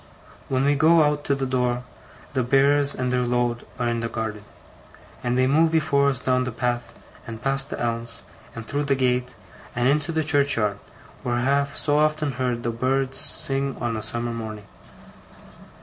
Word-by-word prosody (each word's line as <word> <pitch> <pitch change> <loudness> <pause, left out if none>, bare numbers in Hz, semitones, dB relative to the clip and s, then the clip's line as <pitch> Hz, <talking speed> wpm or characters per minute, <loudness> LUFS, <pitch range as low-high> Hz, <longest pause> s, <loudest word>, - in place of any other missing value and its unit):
When 130 0 +1
we 145 - +4
go 160 +3 +5
out 150 0 0
to 140 - +1
the 135 -1 -2
door, 125 -1 -1 0.5
the 130 - +1
Bearers 140 +3 +3
and 125 -1 -2
their 125 - +2
load 120 -1 -1
are 120 -1 -1
in 120 0 -1
the 115 0 -3
garden; 110 -2 -4 0.8
and 125 0 0
they 130 - +3
move 160 +5 +3
before 145 -3 +2
us 135 - 0
down 130 0 +1
the 125 - -3
path, 120 0 -3 0.3
and 115 -1 -7
past 135 +2 +1
the - - -5
elms, 115 0 -3 0.3
and 115 -1 -7
through 145 +4 -2
the 140 -1 +2
gate, 125 -1 0 0.4
and 125 +1 +1
into 145 +3 +1
the 160 -1 0
churchyard, 140 -9 +2 0.4
where 120 -1 -1
I 120 - 0
have 140 +2 0
so 145 0 +3
often 155 -1 +1
heard 125 -2 -2
the 120 - -1
birds 130 +3 0
sing 135 0 +1
on 120 -2 -2
a 110 - -3
summer 120 +2 +1
morning. 110 -2 -7
130 Hz, 185 wpm, -23 LUFS, 120-140 Hz, 0.8 s, go